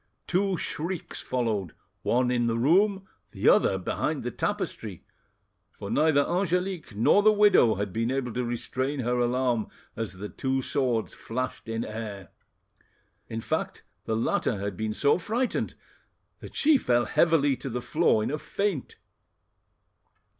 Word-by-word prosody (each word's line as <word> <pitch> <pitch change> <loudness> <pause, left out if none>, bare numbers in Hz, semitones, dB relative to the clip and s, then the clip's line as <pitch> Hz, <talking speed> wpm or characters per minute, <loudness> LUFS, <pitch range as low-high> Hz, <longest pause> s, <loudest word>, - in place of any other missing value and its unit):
Two 190 +1 +1
shrieks 170 +3 -4
followed, 110 -9 -2 0.3
one 125 +1 +2
in 120 -1 +1
the 115 0 0
room, 190 - +3 0.3
the - - -1
other 95 - +5
behind 90 - -2
the - - -3
tapestry, - - -3 0.7
for - - -8
neither 155 -2 +4
Angelique 180 - -1
nor 115 - +4
the 215 +1 +6
widow 205 - +5
had 100 -1 -3
been 115 +2 0
able 130 -3 -2
to 125 - -1
restrain 130 +3 -2
her 125 +1 0
alarm 120 -2 +1 0.3
as 115 -3 -4
the 95 +2 -6
two 135 +4 -1
swords 125 -6 0
flashed 125 0 -5
in 115 +1 -2
air. 105 -4 -6 1.0
In 115 0 -4
fact 160 +7 -3 0.2
the 110 - -1
latter 115 -1 0
had 100 0 -4
been 110 +2 -3
so 145 +4 +3
frightened 235 +8 -1 0.6
that - - -11
she 295 -2 +4
fell 120 - +2
heavily 150 -5 +3
to 135 - -5
the 125 0 -2
floor 150 -5 +2
in - - -2
a 150 - -2
faint. 195 -7 -2
125 Hz, 145 wpm, -27 LUFS, 115-165 Hz, 1.0 s, the